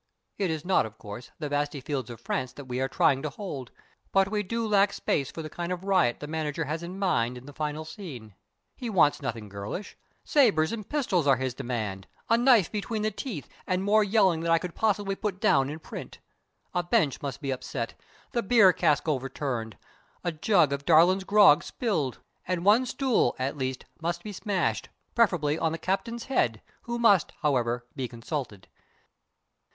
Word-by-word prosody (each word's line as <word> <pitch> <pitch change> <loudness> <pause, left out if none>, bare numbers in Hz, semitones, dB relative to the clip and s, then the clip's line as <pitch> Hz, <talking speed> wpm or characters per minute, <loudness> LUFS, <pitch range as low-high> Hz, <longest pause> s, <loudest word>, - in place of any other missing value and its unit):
It 195 -3 +1
is 160 0 -3
not, 185 -11 +3
of 110 0 -15
course, 105 +4 -9
the 150 - -4
vasty 145 0 -1
fields 130 -3 -3
of 120 -2 -8
France 130 +1 -3
that 145 - -10
we 125 0 -3
are 135 - +1
trying 135 0 +2
to 150 - -2
hold; 140 - -6 0.4
but 195 0 +3
we 210 -1 +1
do 230 +4 -2
lack 200 -1 +4
space 140 -3 -1
for 160 - -7
the - - -5
kind 175 +2 -4
of 180 0 -3
riot 185 -11 +2
the - - -4
manager 155 0 -2
has 155 +3 -3
in 175 +2 -7
mind 125 -11 +1
in 125 - -12
the 145 - -11
final 150 +1 -3
scene. 145 - -9 0.4
He 245 -3 -5
wants 160 -8 +3
nothing 115 -5 -4
girlish. 100 - -6 0.3
Sabers 210 - +3
and 215 -3 -6
pistols 205 - +1
are 135 - +6
his 130 0 -2
demand 110 -7 -4 0.2
a 230 - +6
knife 235 -6 +5
between 215 +1 -2
the 215 - +1
teeth 200 - -6 0.2
and 185 +1 0
more 210 +2 +4
yelling 195 -5 +3
than 165 0 -1
I 165 - +6
could 175 +1 -5
possibly 205 -2 0
put 195 -2 -3
down 135 -6 +3
in 150 - -5
print. 160 - -9 0.6
A 180 - +1
bench 175 - +1
must 140 -2 -4
be 140 -3 -3
upset, 125 -2 -4 0.4
the 235 - 0
beer 205 -4 +6
cask 150 -3 +2
overturned, 130 -5 -2 0.5
a 175 - 0
jug 160 -2 +3
of 140 0 -3
Darlin's 175 +5 +5
grog 200 -7 +6
spilled, 160 - -2 0.3
and 180 -1 -1
one 225 +5 +5
stool, 255 - +1
at 130 +3 -2
least, 130 -2 -3 0.2
must 170 +1 -2
be 210 - -6
smashed 200 0 -1 0.2
preferably 165 -9 +2
on 160 - +1
the 165 - -3
captain's 230 +7 -2
head, 115 - 0 0.2
who 235 0 -2
must, 205 -8 +4
however, 120 -4 +1
be 130 -3 -2
consulted. 115 - -6
160 Hz, 190 wpm, -27 LUFS, 135-200 Hz, 0.6 s, are